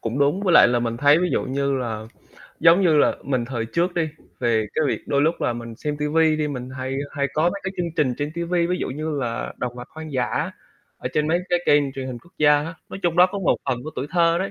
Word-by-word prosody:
cũng 115 +4 -3
đúng. 145 +7 +2
Với 185 - +2
lại 165 - +8
là 120 0 +2
mình 115 -1 -2
thấy 145 +4 +5
ví 180 0 0
dụ - - +1
như 140 +1 -1
là 110 -3 -4 0.5
giống 170 +4 +6
như 160 -4 +4
là - - +3
mình 130 -3 0
thời 115 -2 -3
trước 170 +9 0
đi, 165 -2 0 0.3
về 115 -3 +1
cái 155 - +1
việc - - -1
đôi 140 0 +2
lúc 160 +2 +1
là - - +1
mình 115 -1 -7
xem 150 -1 -3
ti 150 - -1
vi 155 0 +3
đi 150 -1 -1
mình 125 -3 -5
hay 130 +1 -3 0.2
hay 140 -2 0
có 155 - +1
mấy 175 +4 +1
cái 190 - -3
chương 175 - -1
trình 130 -5 +2
trên 145 +1 -2
ti 170 - -3
vi, 170 0 +1
ví 180 +1 0
dụ - - -3
như 150 +2 -3
là 115 -3 -3
động 125 -1 -3
vật 125 - -8
hoang 160 -1 -9
dã 125 -2 -1 0.5
ở - - -4
trên 150 0 +1
mấy 170 - +3
cái 175 0 +2
kênh 145 -2 +3
truyền 135 -1 -5
hình 125 -2 -5
quốc 175 +8 -22
gia 150 -1 +6
á. 165 +2 -6
Nói - - -7
chung 175 -1 0
đó 180 +1 +8
có 200 +2 -5
một 190 - +2
phần 125 0 -1
của 155 - -5
tuổi 130 - -3
thơ 170 -1 +3
đấy. 190 +2 -2
150 Hz, 280 wpm, -23 LUFS, 125-170 Hz, 0.5 s, lại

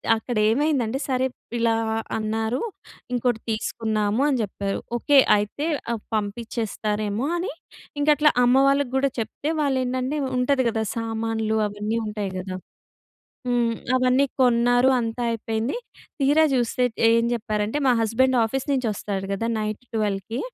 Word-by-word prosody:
అక్కడేమైందంటే, 240 +3 +1
సరే 260 0 +1 0.3
ఇలా 230 -1 +2 0.4
అన్నారు. 220 +3 -1 0.5
ఇంకోటి 245 -2 +1
తీసుకుందాము 220 0 -1
అని 270 -3 +2
చెప్పారు. 200 0 -3 0.2
ఓకే 285 +3 +3 0.2
అయితే 210 +9 -3 0.3
ఆహ్, 220 - -4
పంపించేస్తారేమో 215 +1 -2
అని 380 +8 -2 0.5
ఇంక 290 - 0
అట్లా 300 0 +4
అమ్మవాళ్ళకి 270 +1 +3
కూడా 275 +1 +2
చెప్తే 285 +7 -3
వాళ్ళేంటంటే, 260 0 0 0.2
ఉంటది 260 0 +2
కదా 220 0 -1
సామాన్లు 225 -1 -1
అవన్నీ 210 +3 -2
ఉంటాయి 210 -2 -3
కదా. 185 0 -5 0.9
హ్మ్. 240 -1 +2 0.2
అవన్నీ 255 +2 +3 0.2
కొన్నారు 245 +1 +4
అంతా 230 +1 -3
అయిపోయింది. 225 - -2 0.4
తీరా 290 +4 +4
చూస్తే 245 0 0 0.3
ఏం 230 0 +3
చెప్పారంటే 215 +2 -2
మా - - +6
హస్బెండ్ 255 +4 +2
ఆఫీస్ 265 +5 -2
నుంచి 255 -4 0
వస్తాడు 195 -1 -4
కదా 225 +4 -2
నైట్ 215 +3 -4
12కి. 210 +1 -1
230 Hz, 125 wpm, -24 LUFS, 215-260 Hz, 0.9 s, మా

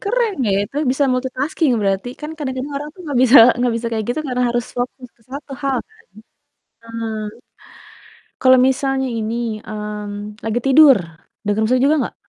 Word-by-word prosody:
Keren 460 +1 0 0.2
ya - - +2
itu, 270 - -11
bisa 270 +2 +1
multitasking 260 +3 -1
berarti, 195 +2 -1
kan 300 - -6
kadang-kadang 275 -1 -4
orang 295 +1 -5
tuh 370 - -15
nggak 285 -5 -1
bisa 260 +1 +6 0.2
nggak 245 -1 +1
bisa 235 - -4
kayak 220 -2 -2
gitu 245 +6 -1
karena 250 0 -1
harus 240 0 -1
fokus 250 +1 -4
ke 230 - -29
1 280 +1 -8
hal 270 -2 0
kan. 440 0 -26 0.9
Eee, 230 0 -5 1.4
kalau 260 0 +6
misalnya 265 0 0
ini, 220 +1 -3 0.3
mmm, 210 0 -6
lagi 225 +2 -1
tidur, 275 0 +7 0.5
dengar 205 +1 0
musik 255 +2 +2
juga 300 +2 +4
gak? - - -18
255 Hz, 165 wpm, -19 LUFS, 225-280 Hz, 1.4 s, tidur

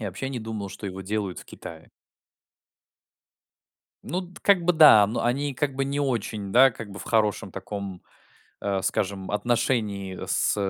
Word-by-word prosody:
Я 105 - -3
вообще 95 +9 -5
не 130 -3 -4
думал, 110 -2 -5
что 100 - -10
его 95 0 -6
делают 100 -1 -3
в - - -10
Китае. 80 -1 -11 2.2
Ну 180 - -2
д 180 0 -13
как 195 -4 +4
бы 180 +1 +3
да, 150 -10 +8
но 110 +4 -2
они 135 +4 0
как 140 +1 -1
бы 135 0 -1
не 140 +1 -2
очень, 110 -6 -2
да, 130 +2 +7
как 115 -2 -9
бы 100 - -9
в - - -8
хорошем 110 -3 0
таком, 100 -3 -6 0.6
а, 100 -1 -1
скажем, 95 -1 -2
отношении 105 -4 -1
с - - +1
110 Hz, 170 wpm, -25 LUFS, 100-135 Hz, 2.2 s, да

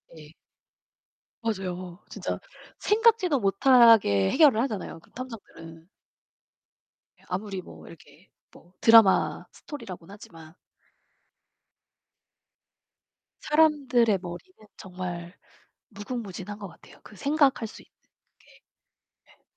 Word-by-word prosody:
네. 150 -1 -14 1.1
맞아요. 185 -5 -5
진짜 - - -5 0.4
생각지도 420 - +2
못하게 200 - +4
해결을 275 -8 +5
하잖아요, 215 -9 -4
그 - - -25
탐정들은. 165 -10 -11 1.4
아무리 190 +1 -4
뭐 - - -14
이렇게 155 +1 -17 0.2
뭐 175 +2 -20
드라마 225 -4 +5
스토리라고는 200 - -10
하지만. 165 -5 -14 2.9
사람들의 275 -9 +2
머리는 210 - -11
정말 180 -1 -7 0.5
무궁무진한 205 -2 -7
것 200 -2 -8
같아요, 165 - -18
그 210 - -15
생각할 280 -3 +1
수 - - -13
있는 - - -28 0.5
게. - - -27 0.8
예. - - -26
205 Hz, 220 characters per minute, -26 LUFS, 175-250 Hz, 2.9 s, 해결을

